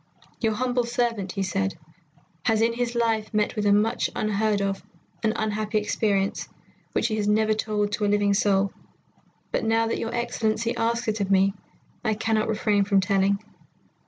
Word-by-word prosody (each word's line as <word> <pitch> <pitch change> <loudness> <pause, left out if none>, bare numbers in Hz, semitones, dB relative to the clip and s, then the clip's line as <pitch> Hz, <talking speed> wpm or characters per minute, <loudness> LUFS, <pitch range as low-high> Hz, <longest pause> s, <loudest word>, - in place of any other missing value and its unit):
"Your 225 -2 +1
humble 250 +1 0
servant," 235 -5 -1
he 195 - -1
said, 195 -1 -1 0.7
"has 220 -1 +3
in 230 0 +2
his 240 0 -2
life 225 -2 0
met 210 +3 +1
with 210 -1 0
much 210 +4 +2
unheard 215 0 +1
of 195 -1 -2 0.4
and 220 - +2
unhappy 215 -1 -1
experience, 205 -2 0 0.4
which - - +1
he 215 - -1
has 205 -1 0
never 215 +1 +3
told 210 -1 -1
to 210 0 -1
a - - +2
living 205 0 +2
soul, 200 -1 +2 0.8
but - - 0
now 225 0 +2
that 225 - -1
your 225 - -3
Excellency 235 -1 -1
asks 235 0 0
it 215 -1 -1
of 195 - -1
me, 195 0 +4 0.5
I 220 -2 +1
cannot 220 0 0
refrain 210 -2 +2
from 200 0 +3
telling. 195 +1 +1
215 Hz, 170 wpm, -25 LUFS, 200-225 Hz, 0.8 s, me